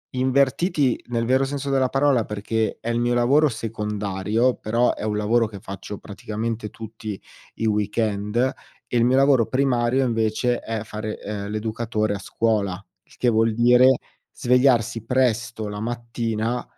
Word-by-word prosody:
Invertiti, 135 +2 +1
nel 115 -1 -1
vero 130 +2 +3
senso 140 0 -3
della 130 -1 +2
parola, 135 -4 +2
perché 105 +1 -2
è 115 - -5
il 115 - 0
mio 120 0 +1
lavoro 140 +5 +4
secondario, 105 +1 -1
però 115 +3 +1
è - - -9
un 105 -1 -1
lavoro 115 +2 +2
che 105 -2 -9
faccio 100 0 -7
praticamente 110 +2 -5
tutti 110 -2 -7 0.4
i 115 - -3
weekend. 105 0 -1
E 125 0 -3
il 120 - +4
mio 130 +2 +3
lavoro 135 -4 +4
primario, 130 -1 +1
invece, 115 +1 0
è 110 -1 -4
fare, 110 0 -6
ehm, 100 -1 -5
l'educatore 110 0 -2
a 100 - -4
scuola. 105 -1 0 0.3
Il - - -23
che 125 - +2
vuol 110 -1 +2
dire 125 +2 +6 0.4
svegliarsi 120 -3 +2
presto 120 -3 0
la 105 0 -5
mattina, 115 0 -2
115 Hz, 150 wpm, -23 LUFS, 105-125 Hz, 0.4 s, dire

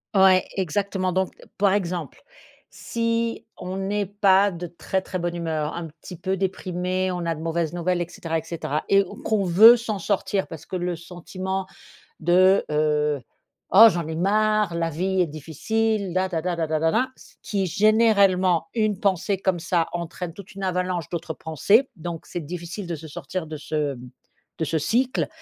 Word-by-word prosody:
Ouais, 190 -1 +6
exactement, 190 +1 -1
donc 185 +1 0 0.3
par 200 -1 +4
exemple, 175 -6 -3 0.5
si 230 0 -2
on 185 +1 -5
n'est 200 +1 -1
pas 200 0 +4
de 175 -2 -6
très, 175 +3 -3
très 185 - -4
bonne 175 0 -2
humeur, 160 -3 -2
un 170 -1 -5
petit 180 - -9
peu 190 +2 -1
déprimé, 185 -1 -2
on 175 -1 -3
a 165 - 0
de 155 - -9
mauvaises 165 0 -1
nouvelles 175 0 0
et 175 - -2
cetera, 165 -2 -3
et - - -10
cetera 155 -2 -3
et 195 0 +5 0.2
qu'on 215 -2 +1
veut 215 +7 +8
s'en 225 -3 -3
sortir 195 +1 -1
parce 160 - -9
que - - -6
le 180 -1 -1
sentiment 185 +3 -5 0.5
de, 185 +4 +4
heu: 150 -2 +1 0.5
«Oh 220 +4 +10
j'en 170 -6 -2
ai 160 - -4
marre, 210 +1 +2
la 165 0 -1
vie 185 +4 0
est - - 0
difficile», 200 +7 -1
la 185 +1 +1
tada 175 0 -2
da 165 -1 -1
da 155 0 0
da 165 +1 +3
da, 250 +8 +1
ce - - -18
qui, 200 -2 -1
généralement, 200 -3 +3
une 215 -4 +1
pensée 195 -1 +1
comme 190 -2 0
ça 170 0 +1
entraîne 170 0 -5
toute 195 0 -12
une 195 - -8
avalanche 180 -3 -1
d'autres 170 -2 -4
pensées. 200 - +2
Donc, 170 -1 -6
c'est 175 - -5
difficile 175 +4 -6
de 170 - -2
se 160 +1 -10
sortir 175 +3 -5
de 155 0 -6
ce 150 -1 -2 0.6
de 160 - 0
ce 160 - -1
cycle. 245 - 0
180 Hz, 180 wpm, -24 LUFS, 165-195 Hz, 0.6 s, Oh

